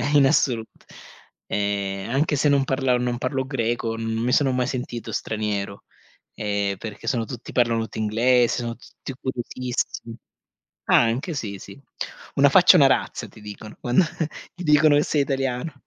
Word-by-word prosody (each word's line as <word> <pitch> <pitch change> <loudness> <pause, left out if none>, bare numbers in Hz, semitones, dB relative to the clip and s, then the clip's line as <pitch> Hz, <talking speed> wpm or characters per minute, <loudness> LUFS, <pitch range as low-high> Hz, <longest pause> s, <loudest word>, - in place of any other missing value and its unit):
in 140 -2 +7
assolut 125 -5 0 0.6
ehm 100 0 -2
anche 145 +4 +1
se 145 +2 +2
non 140 -1 +4
parla 130 -2 +1
non 125 0 -1
parlo 130 +1 -2
greco, 120 -3 -1
no 115 - -5
non 115 0 -2
mi 125 - +1
sono 135 0 +3
mai 125 -1 0
sentito 125 -3 -4
straniero. 105 -2 -3 0.5
Ehm, 100 -2 -1
perché 105 +1 -8
sono 115 -3 0
tutti 125 +1 -8
parlano 115 -2 +2
tutti 110 - -7
inglese. 120 +3 +3
Sono 115 -1 -4
tutti 130 +3 -10
curiosissimi 125 -2 -4 0.7
anche 120 +9 +3
sì, 100 -7 -4
sì, 100 +8 -12 0.5
"una - - +5
faccia - - +7
è - - +6
una - - +7
razza" - - 0
ti - - -16
dicono 105 +1 -10
quando 125 +9 +3 0.5
ti 180 0 -8
dicono 150 -1 +5
che 145 - +4
sei 150 -1 +1
italiano. 135 +1 -2
120 Hz, 165 wpm, -23 LUFS, 110-135 Hz, 0.7 s, in